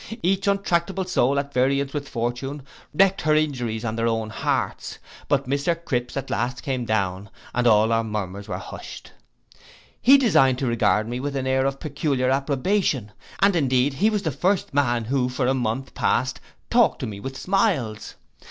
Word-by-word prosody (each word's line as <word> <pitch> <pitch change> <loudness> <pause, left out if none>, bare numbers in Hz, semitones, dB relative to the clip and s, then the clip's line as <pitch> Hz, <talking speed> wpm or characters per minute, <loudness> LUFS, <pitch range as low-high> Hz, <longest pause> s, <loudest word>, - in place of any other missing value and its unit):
Each 195 +3 +1
untractable 195 -1 0
soul 140 -6 +1
at 140 0 -2
variance 135 +2 +1
with 145 -2 -4
fortune, 120 +4 -3 0.3
wreaked 195 +4 +3
her 155 0 +2
injuries 120 -7 -1
on 110 -1 -2
their 115 0 +1
own 110 -1 -1
hearts: - - -2 0.3
but 140 -2 +1
Mr 140 +5 0
Cripse 125 -7 -3
at 135 -1 -4
last 120 +2 -2
came 130 -4 -2
down, 100 -3 -1 0.2
and 125 0 +1
all 110 0 +4
our 115 0 +2
murmurs 100 -2 -5
were - - -3
hushed. - - -9 0.9
He 270 +3 +7
deigned 135 - +4
to 135 - -2
regard 110 -2 +2
me 120 +1 -4
with 140 +1 -3
an 135 -1 -2
air 130 0 +2
of 135 0 -3
peculiar 135 -4 -1
approbation, 140 - 0 0.3
and 200 -1 +4
indeed 130 -3 +2
he 200 +10 +2
was 210 -2 -1
the 160 - 0
first 185 +6 0
man 120 -4 +1
who 125 +1 0
for 125 0 -1
a 130 - +2
month 125 +1 -2
past 130 +1 0 0.3
talked - - +4
to - - -2
me 100 -2 -6
with 135 +5 -6
smiles. 150 - 0
135 Hz, 180 wpm, -23 LUFS, 120-155 Hz, 0.9 s, He